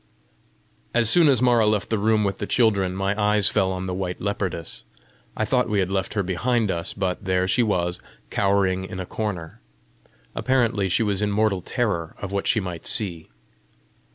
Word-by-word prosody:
As 115 -1 +4
soon 170 -3 +6
as 130 -4 +4
Mara 120 -3 +4
left 105 0 0
the 110 - +1
room 110 +1 +2
with 100 -1 -2
the 105 - -3
children, 100 -6 +2
my 95 +1 0
eyes 105 -1 +4
fell 95 -3 +1
on 95 0 -4
the 90 - -3
white 90 -1 -3
leopardess: 95 -4 -3 0.6
I 110 - 0
thought 125 +2 +1
we 105 - 0
had 95 -1 0
left 95 +1 -2
her 100 - +1
behind 105 +4 0
us, 85 0 -3
but 95 -2 -3
there 95 0 +1
she 120 - +2
was, 90 -6 0 0.3
cowering 95 -2 +1
in 95 0 -7
a 95 - -4
corner. 90 -6 -5 0.7
Apparently 115 -6 +1
she 100 - +2
was 100 -2 0
in 105 - +1
mortal 100 -2 +1
terror 95 -7 -2
of 100 - -6
what 100 -1 -2
she 115 - +3
might 90 -4 -5
see. 85 -7 0
100 Hz, 185 wpm, -23 LUFS, 95-110 Hz, 0.7 s, soon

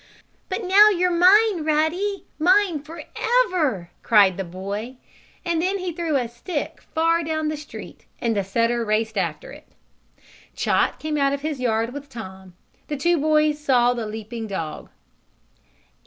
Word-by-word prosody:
"But 380 +3 -3
now 400 +3 +7
you're 360 -3 +1
mine, 380 0 +5
Ruddy! 315 +7 0
Mine 360 -1 +3
forever!" 315 - -1
cried 205 -5 +5
the 195 - -3
boy, 200 +7 -6 0.5
and 340 -2 0
then 380 +3 0
he 365 -2 -4
threw 330 -2 -2
a 250 -3 +1
stick 295 +6 -5
far 330 +1 +2
down 315 -1 -1
the 310 - -2
street 300 0 -11
and 230 -2 0
the 200 - 0
setter 230 +4 0
raced 220 0 -1
after 175 +2 -3
it. 295 +2 -13 0.9
Chot - - +1
came 305 -1 -3
out 275 -1 +2
of 280 - -3
his 300 -2 -3
yard 230 -1 0
with 285 0 -8
Tom. 190 -7 -10 0.3
The 295 - -3
two 340 +4 +2
boys 305 0 +2
saw 245 -4 +3
the 235 -3 -4
leaping 220 +1 -6
dog. 165 -6 -5
295 Hz, 155 wpm, -23 LUFS, 225-340 Hz, 0.9 s, now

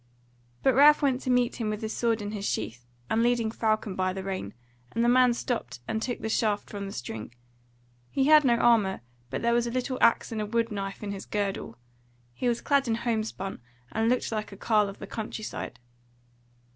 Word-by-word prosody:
But 265 - +5
Ralph 295 +4 +7
went 265 -2 +2
to - - -4
meet 250 -1 +2
him 225 -3 -2
with 215 +1 -3
his 220 - -2
sword 230 -2 0
in 205 - -4
his 210 -2 -5
sheath, 120 - -3 0.2
and 225 - +1
leading 235 -2 +2
Falcon 215 -3 0
by 185 0 0
the 190 0 -5
rein, 185 - -4 0.4
and 230 +1 +1
the - - +3
man 250 0 +5
stopped 130 - -3
and 220 - -1
took 245 0 -3
the - - -2
shaft 215 -2 0
from 200 -1 -5
the - - -6
string: 115 - -6 0.7
he 270 - +1
had 305 +2 +7
no 245 -3 +4
armour, 230 -5 +3 0.3
but - - -4
there 235 0 +3
was 240 0 +2
a - - -3
little 255 +1 -2
axe 230 - +4
and 220 -1 -2
a - - -1
wood 230 +1 0
knife 195 0 -4
in 205 - -3
his 195 -1 -7
girdle; 195 - -3 0.6
he 245 - -2
was 240 -1 +1
clad 280 -2 +2
in 225 - +1
homespun, 220 - -3 0.3
and 225 +1 +1
looked 250 -1 +1
like 215 -1 -3
a 195 - -10
carle 210 -1 +2
of 195 - -9
the - - -7
country 220 +1 -5
side. 125 - -5
220 Hz, 215 wpm, -28 LUFS, 200-240 Hz, 0.7 s, Ralph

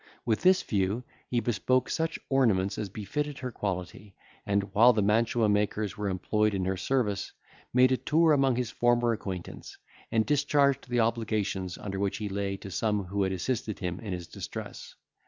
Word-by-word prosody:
With 110 -2 +1
this 185 0 +5
view 100 +3 0 0.3
he 120 -1 +1
bespoke 120 +3 +1
such 165 +1 -1
ornaments 110 -9 +2
as 105 -2 -3
befitted 145 - -4
her 130 -1 -5
quality, 100 -1 -5 0.3
and, 100 0 +2
while 120 +4 +7
the 105 -2 +1
mantua 115 +2 +2
makers 105 -1 0
were 105 -1 -2
employed 105 +3 0
in 95 -1 -1
her 95 +1 0
service, 105 -2 -1 0.4
made 130 +1 +5
a 130 - +3
tour 160 +3 +3
among 135 -3 +3
his 125 -2 -2
former 120 -1 +2
acquaintance, 95 -5 -7 0.3
and 110 -1 +2
discharged 140 -3 +2
the 120 -1 +2
obligations 105 -5 -1
under 95 -1 -5
which 100 -1 -1
he 105 -2 -4
lay 100 0 -2
to 95 - -9
some 105 0 0
who 100 +2 -3
had 95 -1 +1
assisted 110 +3 -2
him 90 -1 -4
in 105 -4 -6
his 90 -1 -4
distress. - - -8
110 Hz, 175 wpm, -28 LUFS, 100-125 Hz, 0.4 s, while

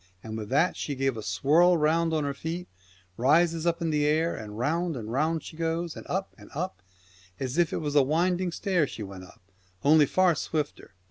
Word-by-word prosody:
And 110 -1 -6
with 110 -2 -5
that 150 +7 +2
she 145 - -4
gave 135 -1 0
a 110 - -5
swirl 145 - +3
round 165 +2 +2
on 155 -2 0
her 140 -1 -1
feet, 165 +5 -5 0.5
and 125 - 0
raises 165 +2 +3
up 170 0 0
in 165 - 0
the 150 -1 +1
air, 160 +3 +1
and 105 -1 -8
round 165 +6 0
and 110 -2 -6
round 155 +5 0
she - - -10
goes, 165 0 -2
and - - -10
up 190 +2 -2
and - - -14
up, 180 - -4 0.6
as 135 +4 -2
if 170 -2 +3
it - - -2
was 145 -2 -2
a 145 - +6
winding 175 +5 +1
stairs 175 -5 0
she 110 - -6
went 95 -2 -9
up, 90 - -19 0.4
only 150 0 +6
far 185 +2 +3
swifter. 150 -8 -4
155 Hz, 215 wpm, -27 LUFS, 135-170 Hz, 0.6 s, a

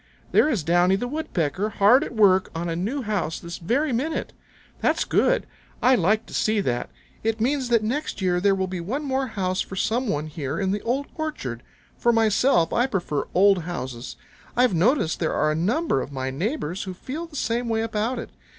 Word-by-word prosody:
There 300 - +4
is 215 - 0
Downy 175 +4 +3
the 245 +5 -2
Woodpecker 210 - -2
hard 235 +8 +6
at 245 - -7
work 190 -3 +4
on 170 +1 -2
a 165 - -2
new 225 +11 -2
house 205 -7 -2
this 170 0 -7
very 255 - 0
minute. 285 +8 -2 0.5
That's - - +1
good. - - +2 0.3
I 255 - +4
like 215 0 +2
to - - -13
see 215 0 +1
that. 125 -11 -1 0.3
It 225 0 0
means 260 +2 0
that 230 -2 +3
next 265 +6 -2
year 180 -2 +1
there 200 0 +4
will 190 -1 0
be 185 -1 -5
one 255 - -3
more 265 -1 -1
house 190 -4 -1
for 195 - -6
some 235 +6 0
one 150 -5 -1
here 150 -2 -4
in 190 -1 0
the 205 +1 -1
Old 265 +4 -1
Orchard. 135 - -4 0.4
For 235 - +4
myself 220 -5 +3
I 240 +2 +3
prefer 175 - -2
old 195 0 +5
houses. 130 -8 -5 0.4
I've 250 -3 +4
noticed 180 - +2
there 160 - 0
are 155 - +2
a - - -1
number 210 - +1
of - - -6
my 130 -1 -3
neighbors 185 - -2
who 185 -1 -6
feel 300 - -6
the 320 - -14
same 235 -2 -1
way 225 -1 +1
about 225 +3 -1
it. - - -6
205 Hz, 205 wpm, -24 LUFS, 175-250 Hz, 0.5 s, hard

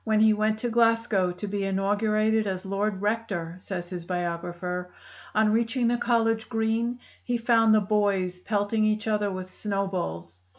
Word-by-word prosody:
"When 215 -1 +2
he 220 0 +6
went 215 +1 +1
to 240 +2 -2
Glasgow 230 -5 +2
to 180 +4 -6
be 200 0 -2
inaugurated 210 +3 +1
as 185 -1 -3
Lord 195 0 -2
Rector," 205 -6 -2
says 180 -2 -6
his 175 -2 -5
biographer, 175 +1 -3 0.5
"on 215 0 +4
reaching 235 +2 +1
the 240 - +1
college 225 -2 +1
green 230 +1 0 0.2
he 245 -1 -1
found 225 -2 +4
the 215 - +4
boys 200 -3 0
pelting 205 +2 0
each 215 +1 +1
other 210 -2 +1
with 185 -1 -6
snowballs. 185 - -3
210 Hz, 160 wpm, -26 LUFS, 185-225 Hz, 0.5 s, he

